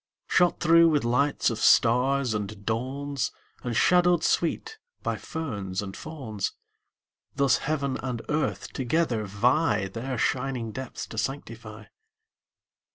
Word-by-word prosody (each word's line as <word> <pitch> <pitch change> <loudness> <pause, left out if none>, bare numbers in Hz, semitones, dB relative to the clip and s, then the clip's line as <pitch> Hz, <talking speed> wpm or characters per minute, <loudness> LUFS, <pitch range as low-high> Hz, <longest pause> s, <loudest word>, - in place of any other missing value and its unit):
Shot 175 -2 +3
through 165 +1 +6
with 150 -4 +2
lights 125 +3 +2
of 115 - -4
stars 125 +1 +4
and 105 -1 -5
dawns, 130 +3 -2 0.3
And 120 -2 -3
shadowed 175 +4 +4
sweet 445 - 0 0.2
by - - -1
ferns 105 - -5
and 95 -1 -7
fawns, 125 -11 -5 0.8
Thus 140 -2 +3
heaven 140 -3 -1
and 125 -3 -4
earth 150 -2 -2
together 130 -4 0
vie 110 +2 +1
Their 125 +6 -4
shining 125 -2 -1
depths 130 +1 -6
to 110 - -5
sanctify. 115 -3 -5
130 Hz, 120 wpm, -26 LUFS, 110-150 Hz, 0.8 s, through